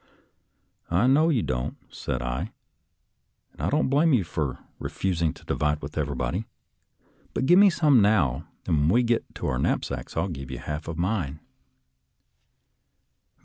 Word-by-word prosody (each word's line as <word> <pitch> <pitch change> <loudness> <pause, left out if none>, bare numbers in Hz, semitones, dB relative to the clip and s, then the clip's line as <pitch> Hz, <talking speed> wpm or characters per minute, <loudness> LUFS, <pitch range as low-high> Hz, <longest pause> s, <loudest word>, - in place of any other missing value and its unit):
I 90 +7 +3
know 145 +5 +4
you 130 -9 +2
don't," 60 -1 -2 0.2
said 60 -1 -3
I, - - -3 0.5
" - - -50
and - - -11
I - - +1
don't 150 +2 +2
blame 150 +4 +3
you 115 -7 +3
for 80 -5 -3 0.2
refusing 85 -4 -1
to - - -17
divide 75 0 0
with 70 +1 -7
every 75 -3 -1
body; 65 - -2 0.9
but - - 0
give 175 +6 +6
me 205 0 +8
some 150 - +4
now, 100 - +2 0.2
and 75 - +2
when 75 +2 +3
we 120 +7 +4
get 120 -1 -1
to - - -5
our 65 - 0
knapsacks - - -2
I'll 85 +4 +1
give 70 -7 -6
you 65 - -5
half 75 +4 -5
of 80 -1 -5
mine." 85 -6 -1
85 Hz, 165 wpm, -26 LUFS, -, 0.9 s, me